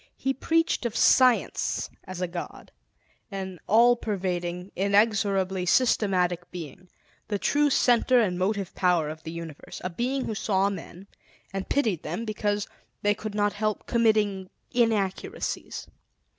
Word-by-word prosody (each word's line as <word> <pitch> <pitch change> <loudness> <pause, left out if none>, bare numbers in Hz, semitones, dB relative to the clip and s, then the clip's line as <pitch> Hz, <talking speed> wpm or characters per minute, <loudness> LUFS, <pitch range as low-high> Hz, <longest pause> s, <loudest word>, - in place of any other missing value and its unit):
He 270 - 0
preached 330 +3 +1
of 225 - -8
Science 255 -2 +3 0.2
as 185 -1 -5
God, 175 - -7 0.6
an 190 -3 -6
all 235 +3 +6
pervading, 180 -4 -3
inexorably 200 -2 +2
systematic 180 -6 +2
Being, 175 +1 -9 0.4
the 205 - -1
true 290 +8 +2
Center 250 -1 +4
and 195 -6 +1
Motive 195 0 -1
Power 175 -4 +2
of 155 +1 -7
the 160 - -7
Universe; 165 -3 -8
a 185 - -3
Being 255 +8 -1
who 220 - -3
saw 200 -1 +1
men 185 0 -8 0.5
and 195 -1 -4
pitied 220 - +1
them 175 +9 -4
because 210 -1 -1 0.4
they 205 0 +4
could 215 0 -6
not 205 0 +1
help 215 0 -2
committing 210 -5 +1 0.2
inaccuracies. 220 -6 -1
200 Hz, 130 wpm, -26 LUFS, 180-225 Hz, 0.6 s, all